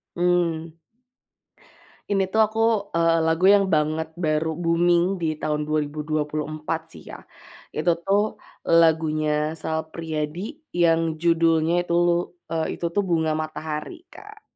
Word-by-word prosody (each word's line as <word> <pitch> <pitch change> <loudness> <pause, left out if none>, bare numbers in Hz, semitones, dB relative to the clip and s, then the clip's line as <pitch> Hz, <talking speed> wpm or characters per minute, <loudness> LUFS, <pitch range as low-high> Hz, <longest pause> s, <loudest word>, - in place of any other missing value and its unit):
Mmm. 170 -2 0 1.4
Ini 195 -1 +2
tuh 220 - +4
aku, 220 +1 -6 0.4
eee, 165 0 +3
lagu 160 +3 +2
yang 200 -1 +4
banget 155 +1 +1 0.2
baru 155 +1 +1
booming 170 +1 +3 0.2
di 165 - 0
tahun 150 0 -1
2024, 155 +1 -2
sih, - - -13
ya. - - -8 0.6
Itu 155 +3 +2
tuh 195 +1 +3 0.6
lagunya 155 -2 +2 0.3
Sal 160 0 -2
Priadi 155 -1 -4 0.4
yang 165 -1 +4 0.2
judulnya 165 -1 +3 0.2
tuh, 170 0 +3 0.7
itu - - -5
tuh 205 - +2
Bunga 160 -2 +1
Matahari, 155 - -5 0.2
Kak. 420 +1 -13
160 Hz, 115 wpm, -23 LUFS, 155-170 Hz, 1.4 s, tuh